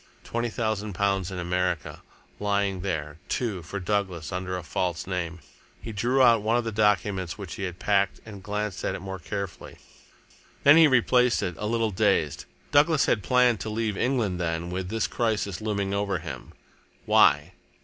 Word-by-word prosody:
Twenty 120 0 -2
thousand 110 -2 -2
pounds 100 -1 0
in 95 - -6
America! 90 -2 -2 0.4
lying 100 -2 0
there, 80 -5 -3
too, 110 -8 -1
for 90 +5 -6
Douglas 95 -5 -2
under 90 0 -3
a 90 - -6
false 90 0 -2
name! 90 -2 -4 0.4
He 115 - -7
drew 125 +6 +2
out 115 -3 +6
one 110 +3 +2
of 120 - 0
the 115 - -3
documents 105 -4 +1
which 100 -5 -7
he 100 - -4
had 90 -1 -6
packed 100 0 +1
and 105 -3 -10
glanced 105 0 -3
at - - -1
it - - -5
more 95 0 -6
carefully. 100 +1 -6 0.9
Then 145 +3 +8
he 165 -1 +8
replaced 125 -2 +3
it, 90 - -2
a 105 - -2
little 115 -1 0
dazed. 90 - +1 0.3
Douglas 150 0 +4
had 105 - +1
planned 125 -1 +3
to 110 - -4
leave 110 -1 -1
England, 110 -7 0
then, 85 0 -2
with 90 0 -3
this 110 +1 0
crisis 110 -5 -1
looming 100 -2 -1
over 100 -1 0
him. 80 - -8 0.5
Why? - - +4
100 Hz, 175 wpm, -26 LUFS, 90-110 Hz, 0.9 s, Then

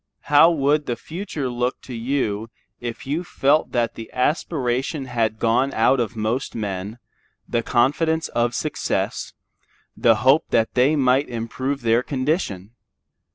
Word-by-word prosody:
How 155 +3 +8
would 150 -2 +1
the 120 - -1
future 160 - -5
look 125 +1 -2
to 130 - -9
you 115 -3 -2 0.3
if 120 -1 -6
you 150 +6 -2
felt 150 -2 +1
that 115 -1 +1
the 115 - -9
aspiration 135 0 -1
had 115 -4 -1
gone 115 +5 +2
out 120 +4 +3
of 115 -1 -2
most 115 +4 -2
men, 100 0 -4 0.5
the 120 - 0
confidence 160 +8 +1
of 120 0 0
success, - - -2 0.6
the 115 -2 +4
hope 135 +4 +5
that 115 -1 +1
they 130 +5 +3
might 135 0 +2
improve 125 +3 -3
their 115 +1 +3
condition? 130 - -2
125 Hz, 140 wpm, -22 LUFS, 115-140 Hz, 0.6 s, How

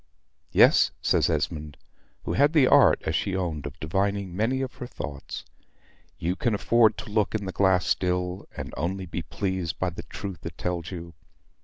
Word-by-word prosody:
"Yes," - - +6
says - - +2
Esmond, 75 -2 -2 0.5
who - - -2
had 145 +3 +4
the 150 -5 +6
art, - - +6
as - - 0
she 100 - 0
owned, 80 -6 -2
of 75 +3 -10
divining 95 +3 -1
many 120 +6 +1
of 130 -1 -3
her 125 - -6
thoughts. 70 - -7 0.7
"You 85 +3 -1
can 115 +1 0
afford 110 0 +4
to 105 - -7
look 105 0 +1
in 105 -2 -2
the 95 - -3
glass 95 -2 +3
still; 90 0 -1
and - - -6
only 95 +7 -2
be 85 0 -4
pleased 95 -2 -3
by 95 -1 -1
the 85 - -7
truth 95 +2 -7
it - - -7
tells 90 -1 -3
you. 85 -2 -7
95 Hz, 180 wpm, -26 LUFS, 85-105 Hz, 0.7 s, Yes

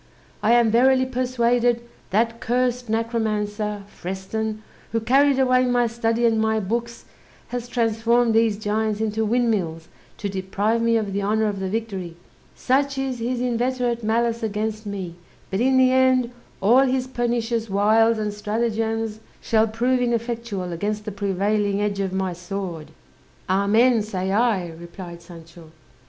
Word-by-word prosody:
I 220 +2 +3
am 235 -2 +4
verily 260 +3 +4
persuaded 245 -2 +1 0.3
that 230 +3 +1
cursed 245 0 0
necromancer, 215 -2 -1
Freston, 210 +3 -5 0.3
who 230 - +2
carried 270 +4 +3
away 255 -1 +3
my 245 -1 +2
study 230 0 0
and 225 -1 +3
my 220 0 +1
books, 235 +4 -3 0.4
has 245 -1 -4
transformed 235 0 +2
these 225 -2 +3
giants 215 0 -1
into 220 0 -1
windmills 210 -8 0 0.3
to 205 - -3
deprive 200 +4 -1
me 230 0 +3
of 205 -3 -2
the 200 - -1
honour 215 +2 +1
of 205 -2 -2
the 190 -1 -2
victory; 195 -6 -4 0.4
such 275 +1 +1
is 265 -2 -2
his 240 +1 -2
inveterate 245 -1 -1
malice 230 +2 +1
against 215 0 -3
me; 185 -4 -5 0.3
but 190 - -1
in 260 +2 +3
the 255 0 +5
end, 260 -2 +3 0.3
all 230 +7 +5
his 260 -1 +1
pernicious 235 -2 -1
wiles 220 +3 +3
and 210 -1 -2
stratagems 220 +1 -2 0.2
shall 220 0 +2
prove 245 +4 +1
ineffectual 230 -6 -2
against 210 +4 -3
the 215 - -4
prevailing 200 +1 0
edge 205 -1 -1
of 195 -1 -1
my 190 -1 -1
sword." 175 -2 -6 0.6
"Amen, 215 +5 +3
say 190 -3 -3
I," 205 -5 +1
replied 170 +1 -10
Sancho. 165 -1 -13
220 Hz, 145 wpm, -23 LUFS, 200-240 Hz, 0.6 s, the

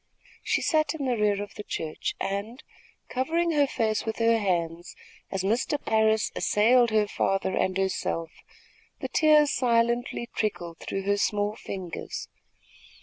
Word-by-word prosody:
She - - 0
sat 310 0 +2
in 285 -3 -3
the 250 -2 +1
rear 205 -2 +1
of 205 - -11
the 210 - -7
church, 160 -6 -4
and, 215 +8 -4 0.4
covering 330 +7 0
her 290 -3 +3
face 220 -4 0
with 220 - -3
her 230 0 +3
hands 175 -4 -2 0.3
as 195 -1 -2
Mr. 235 +8 +1
Parris 220 -2 +2
assailed 235 +3 +4
her 215 -1 +2
father 195 -1 0
and 185 0 0
herself, 180 -4 -1 0.7
the - - -4
tears 305 -2 +5
silently 235 0 +1
trickled 175 -6 -3
through 195 - -4
her 200 +1 +1
small 205 +1 0
fingers. 185 -6 -6
215 Hz, 145 wpm, -27 LUFS, 195-245 Hz, 0.7 s, tears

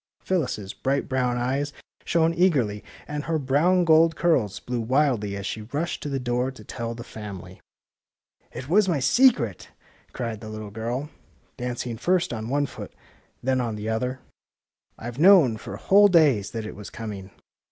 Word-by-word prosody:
Phyllis 175 -9 0
's 100 -2 -7
bright 135 +1 -1
brown 125 -2 0
eyes 135 +4 -1 0.3
shone 165 0 +2
eagerly, 140 - +1 0.2
and 150 0 -4
her 165 0 0
brown 155 +6 +2
gold 165 0 +5
curls 120 - +1
blew 125 -1 -3
wildly 120 -5 +1
as 100 - -6
she 110 - -4
rushed 145 +10 -3
to 145 - -4
the 135 -1 -2
door 125 +1 -1
to 130 -5 -11
tell 115 +2 -5
the 120 - -8
family. 95 -5 -9 0.8
^^ - - -35
It 130 - -7
was 190 +4 +3
my 160 -5 +1
secret! 135 - +3 0.2
" - - -32
cried 115 -3 -4
the 110 - -8
little 110 -1 -7
girl, 120 +8 -4 0.4
dancing 120 -1 -4
first 180 +2 +1
on 110 0 -5
one 145 +2 +1
foot - - -9
and 130 - -11
then 130 -1 +2
on 115 -3 -2
the 105 +1 -4
other. 125 +3 -2 0.8
IVe 120 +3 -7
known 170 - +7
for - - -8
whole 205 +1 +6
days 145 - +4
that 115 -2 -5
it 110 - -7
was 105 -1 -9
com 110 -2 -6
ing! 95 0 -10
125 Hz, 185 wpm, -25 LUFS, 110-155 Hz, 0.8 s, known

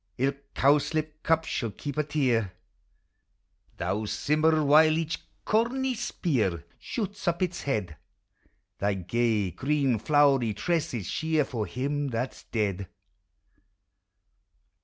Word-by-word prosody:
Ilk 140 +2 -2
cowslip 155 +2 +2
cup 160 0 +2
shall 115 -7 -2
keep 140 +6 -6
a 150 - +2
tear: 125 -10 0 1.2
Thou, 105 +2 -1
Simmer, 155 +6 +2
while 155 +2 +6
each 165 0 -2 0.3
corny 255 +4 +1
spear 110 - -1
Shoots 205 -4 -5
up 170 +1 +1
its 180 -1 -2
head, 100 - -2 0.8
Thy 100 0 +1
gay, 105 +1 0
green 135 - +1
flowery 135 -5 +3
tresses 145 - -1
shear, 160 - 0
For 115 -7 -3
him 140 +7 -2
that 125 0 -2
's - - -16
dead 100 -4 -2
140 Hz, 115 wpm, -27 LUFS, 110-155 Hz, 1.2 s, while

